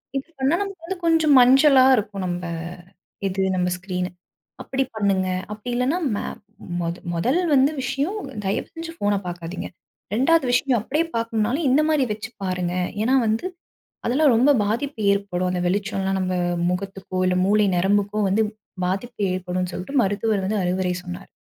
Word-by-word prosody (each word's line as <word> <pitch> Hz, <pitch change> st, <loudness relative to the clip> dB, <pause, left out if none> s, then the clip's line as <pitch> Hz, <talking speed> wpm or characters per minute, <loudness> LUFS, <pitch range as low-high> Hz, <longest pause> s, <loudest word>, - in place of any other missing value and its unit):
Use 290 Hz, +4 st, -5 dB
பண்ணா 270 Hz, +5 st, +2 dB
நமக்கு 390 Hz, -5 st, -6 dB
வந்து 380 Hz, +2 st, -4 dB
கொஞ்சம் 320 Hz, -3 st, +4 dB
மஞ்சளா 265 Hz, +1 st, +6 dB
இருக்கும் 200 Hz, -3 st, -3 dB
நம்ம 175 Hz, 0 st, -3 dB, 0.9 s
எது, 190 Hz, 0 st, -1 dB
நம்ம 180 Hz, 0 st, +1 dB
ஸ்கிரீன். 180 Hz, -1 st, -3 dB, 0.6 s
அப்டி 270 Hz, 0 st, -1 dB
பண்ணுங்க. 195 Hz, -3 st, +1 dB, 0.3 s
அப்டி 210 Hz, +3 st, -8 dB
இல்லைன்னா, 260 Hz, +8 st, +1 dB, 0.2 s
மே -, -, -3 dB, 0.6 s
மொத 170 Hz, 0 st, -2 dB, 0.2 s
மொதல் 240 Hz, -, +1 dB, 0.2 s
வந்து 270 Hz, +3 st, +4 dB
விஷயம் 275 Hz, -, -1 dB, 0.3 s
தயவு 195 Hz, -, -1 dB
செஞ்சு 330 Hz, 0 st, -6 dB
போன 205 Hz, 0 st, +2 dB
பாக்காதீங்க. 175 Hz, 0 st, -5 dB, 0.5 s
2வது 295 Hz, +5 st, +3 dB
விஷயம் 250 Hz, -1 st, +2 dB
அப்டியே 300 Hz, +9 st, 0 dB
பாக்கணும்னாலும் 230 Hz, +6 st, 0 dB
இந்த 275 Hz, +4 st, +4 dB
மாரி 300 Hz, -3 st, +3 dB
வச்சி 215 Hz, +1 st, -5 dB
பாருங்க. 180 Hz, -2 st, -1 dB, 0.3 s
ஏன்னா, 250 Hz, +5 st, +3 dB
வந்து 220 Hz, +8 st, 0 dB, 0.6 s
அதெல்லாம் 275 Hz, +3 st, +4 dB
ரொம்ப 260 Hz, +5 st, +5 dB
பாதிப்பு 235 Hz, +4 st, -2 dB
ஏற்படும், 195 Hz, -2 st, -1 dB
அந்த 180 Hz, -1 st, -1 dB
வெளிச்சம் 195 Hz, +1 st, -1 dB
எல்லாம் 195 Hz, 0 st, 0 dB
நம்ம 185 Hz, 0 st, -1 dB, 0.4 s
முகத்துக்கோ, 190 Hz, 0 st, -4 dB
இல்ல 180 Hz, 0 st, +2 dB
மூளை 210 Hz, +1 st, +4 dB
நரம்புக்கோ 205 Hz, +3 st, +1 dB
வந்து 205 Hz, +4 st, +2 dB, 0.4 s
பாதிப்பு 215 Hz, +5 st, -3 dB
ஏற்படும்னு 180 Hz, 0 st, -3 dB
சொல்லிட்டு 255 Hz, +9 st, -1 dB
மருத்துவர் 205 Hz, 0 st, 0 dB
வந்து 210 Hz, +1 st, 0 dB
அறிவுரை 180 Hz, 0 st, 0 dB
சொன்னார். 180 Hz, +1 st, -8 dB
210 Hz, 150 wpm, -23 LUFS, 185-270 Hz, 0.9 s, மஞ்சளா